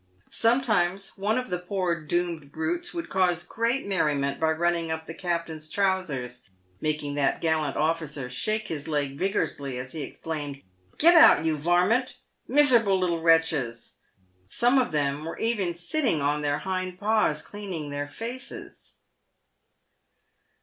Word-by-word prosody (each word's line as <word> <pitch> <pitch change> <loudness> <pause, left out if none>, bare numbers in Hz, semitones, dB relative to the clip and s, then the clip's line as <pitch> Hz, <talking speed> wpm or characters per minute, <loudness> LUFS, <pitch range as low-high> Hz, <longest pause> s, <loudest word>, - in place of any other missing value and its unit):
Sometimes 215 -6 +1
one 205 +4 0
of 255 0 -3
the 180 - -1
poor 180 -2 -2
doomed 165 -2 -2
brutes 340 +2 -2
would 340 -1 -5
cause 180 -2 +1
great 230 +8 -1
merriment 145 -8 0
by 160 - +2
running 170 +1 0
up 160 0 -3
the 160 - -7
captain's 170 -3 -3
trousers, 160 -10 -1 0.4
making 150 -2 -2
that 145 -1 +1
gallant 160 -3 0
officer 155 -3 -1
shake 215 - -2
his 150 -2 -4
leg 145 -3 -1
vigorously 145 -7 -2
as 130 +1 -6
he 160 - -5
exclaimed, 145 -3 -6 0.2
" 90 0 -34
Gret 340 +3 +7
out, 315 - +7
you 160 -1 +2
var 175 +4 +2
mint 245 +5 0 0.2
!" - - -46
Miserable 240 -8 +5
little 170 -2 0
wretches! 160 -8 +1 0.5
some 245 - +3
of 255 - 0
them 145 -1 0
were 165 - -6
even 205 -7 0
sitting 175 - 0
on 145 +1 0
their 145 0 0
hind 185 +2 -4
paws 210 -8 +1
cleaning 185 -8 -6
their 145 0 -3
faces. 240 - -7
170 Hz, 150 wpm, -26 LUFS, 150-205 Hz, 0.5 s, Gret